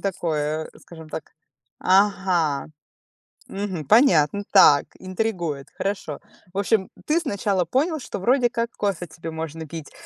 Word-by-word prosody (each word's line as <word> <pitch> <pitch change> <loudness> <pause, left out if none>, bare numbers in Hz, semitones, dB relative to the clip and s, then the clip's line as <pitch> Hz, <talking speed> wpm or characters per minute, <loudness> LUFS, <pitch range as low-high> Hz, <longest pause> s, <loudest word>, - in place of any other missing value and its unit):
такое, 155 -5 -2
скажем 160 -2 -12
так 155 - -7 0.5
Ага, 185 -7 +2 0.8
мгм, 195 -6 -4
понятно, 200 - +4
так, 145 -7 +7
интригует, 180 -7 -3
хорошо. 195 -7 -3 0.3
В - - -7
общем, 200 -1 +1 0.2
ты 310 +3 +2
сначала 200 - -1
понял, 305 - 0
что 255 - -6
вроде 245 +5 +3
как 235 0 -2
кофе 195 -4 -1
тебе 165 +1 -8
можно 160 0 -6
пить 160 -2 -8
185 Hz, 125 wpm, -23 LUFS, 160-205 Hz, 0.8 s, так